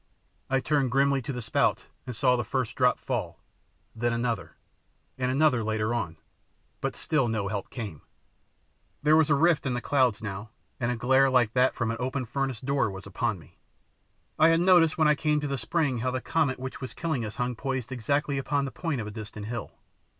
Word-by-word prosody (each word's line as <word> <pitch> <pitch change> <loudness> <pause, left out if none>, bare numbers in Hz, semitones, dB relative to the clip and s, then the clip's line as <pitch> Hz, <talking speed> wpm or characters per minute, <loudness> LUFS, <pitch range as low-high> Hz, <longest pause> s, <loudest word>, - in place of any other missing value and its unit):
I 135 0 +2
turned 140 -2 +1
grimly 135 +2 +2
to 125 - -5
the 125 -2 -5
spout 115 - +1 0.2
and 125 - -5
saw 125 +4 +3
the 120 - -1
first 125 +2 -2
drop 125 -1 +3
fall, - - -3 0.6
then 120 +1 0
another, 115 -8 -2 0.6
and 125 -1 -1
another 135 -3 +3
later 110 +1 0
on, 85 -9 -3 0.6
but - - -2
still 145 -6 0
no 110 -3 -1
help 100 -1 -4
came. 105 - -6 1.0
There 150 +1 +5
was 155 -1 +4
a - - +5
long 145 - +1
rift 170 -5 +3
in 125 - 0
the - - -1
clouds 125 -5 +2
now, 105 0 -6 0.3
and 120 +1 0
a - - -1
glare 130 +3 +4
like 125 -4 +3
that 130 +1 +3
from 115 -2 -1
an 115 - -3
open 130 +1 -2
furnace 135 -1 -2
door 135 -3 +1
was 95 -1 -8
upon - - -1
me. - - -18 0.8
I 160 +1 +7
had 165 0 +4
noticed 175 -3 +5
when 155 -2 +4
I 150 - +6
came 150 0 +1
to 145 - -3
the 140 - -1
spring 130 +2 0
how 130 +3 0
the 130 0 -1
comet 150 -2 0
which 130 +1 -7
was 130 - -6
killing 155 -8 -1
us 110 -1 -5
hung 125 -1 -2
poised 130 -1 -3
exactly 140 +3 0
upon 140 +1 0
the 135 - -5
point 160 -6 -2
of - - -5
a 105 - -6
distant 105 -1 -7
hill. 120 0 -5
130 Hz, 210 wpm, -27 LUFS, 115-140 Hz, 1.0 s, I